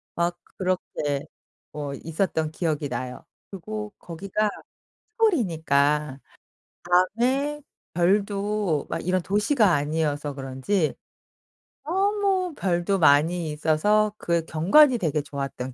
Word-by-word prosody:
막 170 Hz, +1 st, 0 dB, 0.2 s
그렇게 150 Hz, -6 st, -2 dB, 0.5 s
뭐 145 Hz, -2 st, -5 dB
있었던 160 Hz, 0 st, -2 dB
기억이 155 Hz, -3 st, -2 dB
나요. 125 Hz, 0 st, -5 dB, 0.3 s
그리고 210 Hz, +2 st, -6 dB
거기가 195 Hz, +5 st, -2 dB, 0.6 s
시골이니까 155 Hz, -, +1 dB, 1.0 s
밤에 280 Hz, +4 st, +1 dB, 0.3 s
별도 200 Hz, -2 st, +1 dB
막 -, -, -2 dB
이런 185 Hz, +1 st, +1 dB
도시가 205 Hz, -, +2 dB
아니어서 145 Hz, -1 st, -1 dB
그런지 135 Hz, +6 st, -1 dB, 0.9 s
너무 385 Hz, 0 st, +1 dB
별도 185 Hz, -1 st, 0 dB
많이 160 Hz, +2 st, +3 dB
있어서 205 Hz, +8 st, +2 dB
그 170 Hz, -4 st, 0 dB
경관이 240 Hz, -, +5 dB
되게 155 Hz, -3 st, 0 dB
좋았던 135 Hz, -3 st, -5 dB
170 Hz, 225 characters per minute, -25 LUFS, 150-210 Hz, 1.0 s, 경관이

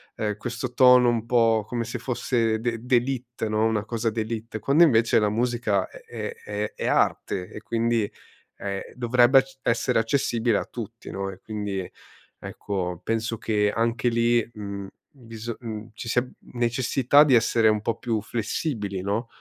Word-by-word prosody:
ehm, 105 Hz, -1 st, -2 dB
questo 120 Hz, +2 st, -5 dB
tono 125 Hz, -1 st, +6 dB
un 115 Hz, -1 st, 0 dB
po' 115 Hz, -3 st, +3 dB
come 120 Hz, -1 st, -2 dB
se 120 Hz, +1 st, -5 dB
fosse 115 Hz, -2 st, 0 dB
d'e 115 Hz, -1 st, -1 dB
d'élite, 125 Hz, -2 st, -1 dB
no, 110 Hz, +1 st, +1 dB
una 110 Hz, -2 st, +1 dB
cosa 115 Hz, 0 st, -1 dB
d'élite. 110 Hz, 0 st, -4 dB
Quando 140 Hz, +10 st, +4 dB
invece 115 Hz, -5 st, +4 dB
la 105 Hz, -, +2 dB
musica 115 Hz, -3 st, 0 dB
è -, -, -12 dB
è -, -, -5 dB
è 105 Hz, +1 st, -3 dB
è -, -, -3 dB
arte 90 Hz, 0 st, 0 dB
e 105 Hz, -, -8 dB
quindi, 115 Hz, -2 st, 0 dB, 0.5 s
ehm, 100 Hz, -1 st, -4 dB
dovrebbe 125 Hz, +2 st, +5 dB
c 135 Hz, 0 st, -18 dB
essere 115 Hz, 0 st, +1 dB
accessibile 115 Hz, -2 st, +1 dB
a -, -, -1 dB
tutti, 115 Hz, -1 st, -8 dB
no? 95 Hz, 0 st, -3 dB
E 95 Hz, -, -12 dB
quindi 105 Hz, -3 st, -4 dB, 0.5 s
ecco 90 Hz, -3 st, -4 dB
penso 115 Hz, 0 st, -1 dB
che 105 Hz, -2 st, +1 dB
anche 115 Hz, +2 st, 0 dB
lì, 115 Hz, 0 st, +2 dB
uhm, 100 Hz, -2 st, -6 dB, 0.2 s
biso 115 Hz, -3 st, -8 dB
uhm, 110 Hz, -1 st, -7 dB
ci 115 Hz, -, -8 dB
sia 125 Hz, +2 st, +2 dB, 0.3 s
necessità 125 Hz, +3 st, +3 dB
di 140 Hz, -, +3 dB
essere 115 Hz, -1 st, +3 dB
un 110 Hz, -1 st, +1 dB
po' 115 Hz, 0 st, -2 dB
più 115 Hz, -3 st, -1 dB
flessibili, 110 Hz, -, -3 dB
no? 105 Hz, +5 st, -2 dB
115 Hz, 165 wpm, -25 LUFS, 105-120 Hz, 0.5 s, tono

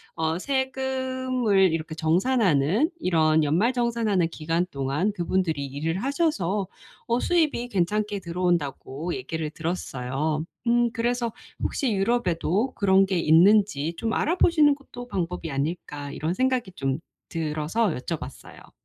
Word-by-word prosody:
어 160 Hz, +1 st, -1 dB
세금을 260 Hz, -5 st, +1 dB
이렇게 160 Hz, -1 st, -3 dB
정산하는 180 Hz, -, +2 dB
이런 160 Hz, -, +3 dB
연말 175 Hz, -, +2 dB
정산하는 230 Hz, -7 st, +1 dB
기간 165 Hz, +2 st, -1 dB
동안 140 Hz, +9 st, 0 dB
그분들이 175 Hz, -5 st, -1 dB
일을 155 Hz, +7 st, -3 dB
하셔서 210 Hz, -, 0 dB, 0.4 s
어 235 Hz, +1 st, +2 dB
"수입이 305 Hz, -8 st, +1 dB
괜찮게 205 Hz, +1 st, 0 dB
들어온다."고 170 Hz, -3 st, -2 dB
얘기를 160 Hz, -5 st, -4 dB
들었어요. 155 Hz, -2 st, -2 dB, 0.2 s
음 240 Hz, 0 st, +3 dB
그래서 240 Hz, 0 st, 0 dB, 0.3 s
혹시 250 Hz, -6 st, 0 dB
유럽에도 200 Hz, +2 st, 0 dB
그런 195 Hz, -1 st, +4 dB
게 190 Hz, -2 st, 0 dB
있는지 170 Hz, -1 st, +4 dB
'좀 225 Hz, -1 st, -2 dB
알아보시는 315 Hz, -3 st, +4 dB
것도 250 Hz, -3 st, -10 dB
방법이 180 Hz, -6 st, -3 dB
아닐까?' 145 Hz, 0 st, -3 dB
이런 160 Hz, +4 st, -2 dB
생각이 255 Hz, -2 st, 0 dB
좀 135 Hz, -4 st, -2 dB, 0.3 s
들어서 160 Hz, +6 st, -1 dB
여쭤봤어요. 155 Hz, -1 st, -7 dB
185 Hz, 300 characters per minute, -25 LUFS, 160-235 Hz, 0.4 s, 그런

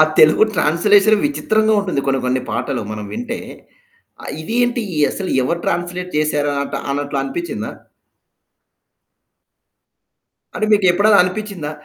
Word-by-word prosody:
ఆ! -, -, +9 dB, 0.2 s
తెలుగు 155 Hz, +7 st, +6 dB
ట్రాన్స్‌లేషన్ 205 Hz, +7 st, +3 dB
విచిత్రంగా 220 Hz, -6 st, +1 dB
ఉంటుంది 185 Hz, -8 st, -2 dB
కొన్ని 135 Hz, -1 st, +1 dB
కొన్ని 130 Hz, 0 st, 0 dB
పాటలు 135 Hz, -4 st, -2 dB
మనం 105 Hz, -1 st, -6 dB
వింటే. 240 Hz, +1 st, -4 dB, 0.9 s
ఆహ్, -, -, -6 dB
ఇది 225 Hz, -, -5 dB
ఏంటి 245 Hz, 0 st, -1 dB, 0.3 s
అసలు 190 Hz, -2 st, -4 dB
ఎవరు 170 Hz, +6 st, -1 dB
ట్రాన్స్‌లే‌ట్ 180 Hz, +1 st, -3 dB
చేసారాట 145 Hz, -2 st, -1 dB, 0.2 s
అన్నట్లు 140 Hz, 0 st, -2 dB
అనిపిచ్చిందా? 345 Hz, -, -4 dB, 2.8 s
అంటే 215 Hz, -, -1 dB
మీకు 205 Hz, -2 st, +3 dB
ఎప్పుడైనా 205 Hz, +3 st, +4 dB
అనిపిచ్చిందా? 180 Hz, -4 st, -4 dB
180 Hz, 115 wpm, -18 LUFS, 145-215 Hz, 2.8 s, ఆ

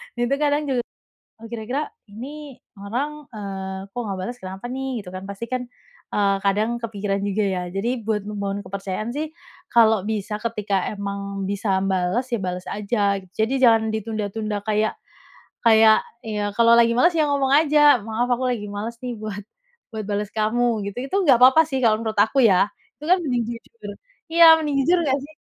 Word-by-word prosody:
Itu 240 Hz, +2 st, -1 dB
kadang 295 Hz, 0 st, +1 dB
juga 250 Hz, -, +1 dB, 0.6 s
"Oh, 225 Hz, -, -14 dB
kira-kira 240 Hz, +6 st, -4 dB, 0.2 s
ini 270 Hz, +6 st, -9 dB, 0.2 s
orang, 280 Hz, +8 st, -4 dB
eee, 195 Hz, -2 st, -6 dB
kok, 245 Hz, -, -4 dB
nggak 195 Hz, -, -3 dB
bales 240 Hz, +7 st, -5 dB
kenapa 190 Hz, +4 st, -7 dB
nih?" 265 Hz, +1 st, -3 dB, 0.2 s
Gitu 180 Hz, -, -9 dB
kan, 185 Hz, -, -6 dB
pasti 200 Hz, +3 st, -6 dB
kan, 250 Hz, -1 st, -2 dB, 0.5 s
eee, 200 Hz, -1 st, +3 dB
kadang 215 Hz, +4 st, 0 dB
kepikiran 205 Hz, -3 st, -3 dB
juga 205 Hz, +1 st, 0 dB
ya. 185 Hz, -2 st, -1 dB
Jadi 230 Hz, +7 st, -2 dB
buat 210 Hz, -2 st, -2 dB
membangun 200 Hz, -1 st, -4 dB
kepercayaan 200 Hz, +4 st, -4 dB
sih 305 Hz, +3 st, -3 dB, 0.4 s
kalau 220 Hz, -2 st, +4 dB
bisa, 210 Hz, 0 st, -3 dB
ketika 210 Hz, -4 st, -1 dB
emang 200 Hz, -1 st, -5 dB
bisa 195 Hz, 0 st, -1 dB
m 190 Hz, 0 st, 0 dB
bales, 185 Hz, +7 st, 0 dB
ya 230 Hz, -, 0 dB
bales 180 Hz, 0 st, -4 dB
aja. 200 Hz, -1 st, 0 dB, 0.2 s
Jadi 220 Hz, +3 st, +1 dB
jangan 225 Hz, -3 st, +4 dB
ditunda-tunda 215 Hz, -1 st, -3 dB
kayak 215 Hz, 0 st, 0 dB, 0.7 s
kayak, 220 Hz, -1 st, +7 dB, 0.2 s
ya 210 Hz, -2 st, -3 dB
kalau 235 Hz, +2 st, +6 dB
lagi 235 Hz, 0 st, +5 dB
males, 335 Hz, +9 st, +4 dB
ya 310 Hz, -, +3 dB
ngomong 280 Hz, -2 st, +1 dB
aja, 295 Hz, -4 st, +5 dB
"Maaf 225 Hz, +3 st, -1 dB
aku 255 Hz, +1 st, +1 dB
lagi 210 Hz, -3 st, -6 dB
males 210 Hz, +3 st, -5 dB
nih, 245 Hz, -2 st, -5 dB
buat 210 Hz, -1 st, -6 dB, 0.5 s
buat 220 Hz, -2 st, -5 dB
bales 205 Hz, 0 st, -2 dB
kamu," 220 Hz, 0 st, 0 dB
gitu. 200 Hz, -, -7 dB
Itu 385 Hz, -, -2 dB
nggak 250 Hz, -5 st, +5 dB
papa 265 Hz, +5 st, +7 dB
sih, 265 Hz, -4 st, -3 dB
kalau 220 Hz, -2 st, +4 dB
menurut 220 Hz, -1 st, -2 dB
aku 225 Hz, +6 st, +2 dB
ya, 195 Hz, 0 st, +4 dB, 0.3 s
itu -, -, -9 dB
kan 365 Hz, -, +6 dB
mending 250 Hz, -8 st, -1 dB
jujur 240 Hz, -, -9 dB, 0.3 s
iya, 330 Hz, -1 st, +9 dB
mending 280 Hz, -3 st, 0 dB
jujur 345 Hz, +1 st, +3 dB
nggak 275 Hz, -3 st, +1 dB
sih? 310 Hz, -, -17 dB
220 Hz, 180 wpm, -22 LUFS, 200-250 Hz, 0.7 s, iya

